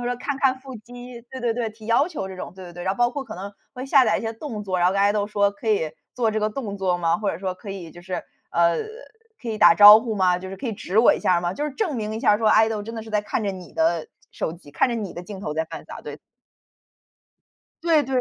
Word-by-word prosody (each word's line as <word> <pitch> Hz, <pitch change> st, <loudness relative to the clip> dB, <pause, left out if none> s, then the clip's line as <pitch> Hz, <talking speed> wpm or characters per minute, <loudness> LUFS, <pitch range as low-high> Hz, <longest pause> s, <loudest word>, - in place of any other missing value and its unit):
或 -, -, -5 dB
者 -, -, 0 dB
说 245 Hz, -, -3 dB
看 285 Hz, +2 st, -3 dB
看 260 Hz, -1 st, +2 dB
腹 265 Hz, -1 st, -10 dB
肌， 245 Hz, +2 st, -11 dB
对 260 Hz, -1 st, -7 dB
对 235 Hz, -2 st, 0 dB
对， 235 Hz, -2 st, -2 dB
提 215 Hz, 0 st, -14 dB
要 255 Hz, +8 st, +3 dB
求 290 Hz, -, -5 dB
这 190 Hz, -, -8 dB
种， 185 Hz, -, -7 dB
对 185 Hz, 0 st, -11 dB
对 175 Hz, -, -10 dB
对。 175 Hz, 0 st, -8 dB
然 190 Hz, -, 0 dB
后 200 Hz, -, -9 dB
包 240 Hz, 0 st, +3 dB
括 280 Hz, -, -3 dB
可 -, -, -9 dB
能， 200 Hz, +2 st, -7 dB, 0.2 s
会 255 Hz, +1 st, -6 dB
下 270 Hz, -1 st, +5 dB
载 -, -, +2 dB
一 -, -, -5 dB
些 225 Hz, 0 st, -3 dB
动 225 Hz, -3 st, -6 dB
作， 185 Hz, -2 st, -1 dB
然 175 Hz, -, +5 dB
后 -, -, 0 dB
跟 195 Hz, -, +1 dB
Idol 205 Hz, +1 st, +2 dB
说 200 Hz, -1 st, +2 dB
可 210 Hz, +2 st, -6 dB
以 180 Hz, -8 st, +1 dB, 0.2 s
做 230 Hz, -3 st, +1 dB
这 215 Hz, -, -1 dB
个 215 Hz, -, 0 dB
动 210 Hz, -4 st, -5 dB
作 185 Hz, -2 st, 0 dB
吗？ 165 Hz, -1 st, +2 dB
或 210 Hz, -2 st, 0 dB
者 165 Hz, -, -6 dB
说 185 Hz, -1 st, -3 dB
可 195 Hz, +2 st, -10 dB
以 180 Hz, -5 st, -8 dB
就 175 Hz, -, -13 dB
是， 185 Hz, +1 st, -5 dB, 0.4 s
呃 170 Hz, -1 st, +3 dB, 0.6 s
可 235 Hz, -, -5 dB
以 215 Hz, -1 st, -3 dB
打 210 Hz, -, +7 dB
招 210 Hz, +1 st, +10 dB
呼 225 Hz, -1 st, -3 dB
吗？ 185 Hz, -3 st, +2 dB
就 185 Hz, -, -8 dB
是 195 Hz, -, -7 dB
可 260 Hz, -, -5 dB
以 225 Hz, -, -2 dB
指 195 Hz, -1 st, -5 dB
我 240 Hz, -, +6 dB
一 -, -, -2 dB
下 175 Hz, -1 st, +2 dB
吗？ 175 Hz, 0 st, -1 dB
就 290 Hz, -, -3 dB
是 300 Hz, -, -2 dB
证 340 Hz, -, -2 dB
明 215 Hz, -1 st, -3 dB
一 220 Hz, -, -4 dB
下 210 Hz, -1 st, +4 dB
说 220 Hz, -1 st, +2 dB
Idol 220 Hz, -1 st, +4 dB
真 230 Hz, -, -7 dB
的 225 Hz, -, -5 dB
是 220 Hz, -, -11 dB
在 210 Hz, -1 st, +1 dB
看 210 Hz, +1 st, -3 dB
着 200 Hz, -, 0 dB
你 185 Hz, -2 st, -10 dB
的 325 Hz, +8 st, +1 dB, 0.2 s
手 160 Hz, -, -3 dB
机， 165 Hz, -4 st, -14 dB
看 250 Hz, -, +2 dB
着 240 Hz, -, -2 dB
你 210 Hz, -5 st, -4 dB
的 175 Hz, -, -7 dB
镜 195 Hz, 0 st, -8 dB
头 150 Hz, -, -4 dB
在 160 Hz, +1 st, -1 dB
饭 -, -, -9 dB
撒， -, -, -9 dB
对。 -, -, -8 dB, 1.7 s
对 325 Hz, -3 st, +4 dB
对。 265 Hz, 0 st, -2 dB
215 Hz, 340 characters per minute, -23 LUFS, 190-240 Hz, 1.7 s, 招